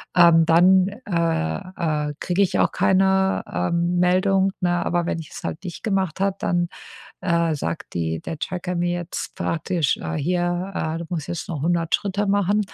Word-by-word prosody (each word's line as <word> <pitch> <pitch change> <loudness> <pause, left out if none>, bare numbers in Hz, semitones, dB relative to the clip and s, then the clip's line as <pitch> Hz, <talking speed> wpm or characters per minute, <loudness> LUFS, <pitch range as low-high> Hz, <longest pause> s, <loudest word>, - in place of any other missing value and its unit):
Ähm, 170 -2 +6
dann, 180 +3 +5
äh, 165 - -2
äh, - - -5
kriege 180 +2 0
ich 195 - +2
auch - - +3
keine, 190 0 +3
ähm, 170 0 0
Meldung, 190 +2 +3
ne, 175 -1 +1
aber 175 0 0
wenn 165 - -2
ich 155 - -9
es - - -9
halt 165 - -4
nicht 180 -3 -7
gemacht 190 -5 -1
hat, 195 0 -1
dann, 175 0 +1 0.6
äh, 170 -2 +1
sagt 85 -10 -5
die 80 -1 -2
der 160 - -6
Tracker 180 +2 -3
mir 175 0 0
jetzt 175 -1 -5
praktisch, 165 -2 0
äh, 80 0 -4
hier, 175 +3 -1
äh, 160 +1 -2
„Du 170 - -6
musst 160 -4 -3
jetzt 170 - -4
noch 150 -5 -4
100 170 0 0
Schritte 205 0 -2
machen.” 200 +1 +2
175 Hz, 180 wpm, -23 LUFS, 165-190 Hz, 0.6 s, Ähm